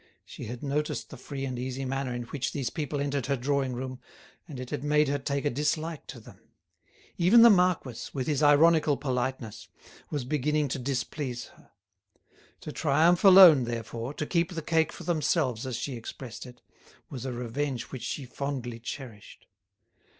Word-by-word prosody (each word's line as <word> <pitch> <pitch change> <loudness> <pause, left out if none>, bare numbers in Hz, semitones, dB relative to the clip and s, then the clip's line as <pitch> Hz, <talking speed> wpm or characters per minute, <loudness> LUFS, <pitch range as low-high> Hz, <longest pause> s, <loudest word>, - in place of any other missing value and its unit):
She - - -9
had 120 +4 -7
noticed 150 +2 -2
the - - -7
free 135 -2 -6
and 130 -2 -4
easy 130 +1 -4
manner 135 0 -2
in 120 0 -3
which 130 +2 -4
these 135 -5 -2
people 150 -2 -3
entered 140 -2 -2
her 140 - +1
drawing 135 0 -1
room, 130 +1 -5 0.5
and 145 -6 -8
it 130 -1 -7
had 130 - -3
made 150 0 +3
her 145 0 0
take 140 +1 -2
a 145 - +2
dislike 155 +4 -2
to - - -8
them. - - -15 0.8
Even 205 +7 +7
the 235 - +9
marquis, 180 - +1
with 130 -3 -3
his 150 -2 0
ironical 150 0 +5
politeness, 130 -4 -3 0.4
was 145 -5 -3
beginning 150 +1 0
to 135 - -3
displease 125 -1 -3
her. - - -22 0.9
To 150 - -6
triumph 160 +4 +3
alone, 185 -9 +9
therefore, 115 +3 -5
to 150 - -3
keep 170 +2 0
the 165 - -4
cake 160 0 +1
for - - -10
themselves, 150 -7 0
as 130 - -3
she 135 - -4
expressed 120 +1 -8
it, 125 0 -15 0.5
was 130 -4 -6
a 130 - -3
revenge 125 +1 -3
which 130 - -6
she 140 - -4
fondly 125 -3 -5
cherished. 115 -2 -9
140 Hz, 175 wpm, -28 LUFS, 125-150 Hz, 0.9 s, the